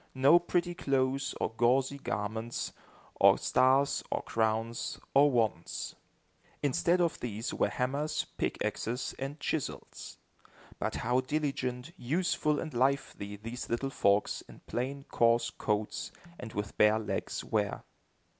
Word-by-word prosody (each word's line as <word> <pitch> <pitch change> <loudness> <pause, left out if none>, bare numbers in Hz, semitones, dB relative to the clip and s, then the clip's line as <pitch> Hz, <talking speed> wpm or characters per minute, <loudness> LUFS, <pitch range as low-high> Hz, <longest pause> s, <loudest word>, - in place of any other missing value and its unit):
No 140 +6 +7
pretty 175 0 0
clothes 135 -3 0
or - - 0
gauzy 130 +4 +2
garments, 110 +1 -3 0.4
or - - +7
stars, 135 +2 +3
or - - -1
crowns, 115 +1 -1 0.2
or 145 +2 +7
wands! 110 -9 -1 0.7
Instead 170 +6 +2
of 170 -2 +1
these 115 -1 -4
were - - +2
hammers, 145 +4 -1
pickaxes, 120 +3 -2
and 135 +3 -4
chisels. 155 -5 -4 0.6
But - - -1
how 125 +3 +1
diligent, 135 -1 -2
useful 150 +2 +1
and 155 - -5
lively 130 -5 0
these 115 +4 -6
little 135 +4 -1
folks, 100 -4 +2
in - - -13
plain, 135 +3 -3
coarse 115 -2 +2
coats 105 -1 -2 0.3
and 110 - -7
with 105 0 -4
bare 105 +1 +6
legs, 110 - -3
were! - - -1
130 Hz, 125 wpm, -31 LUFS, 115-140 Hz, 0.7 s, No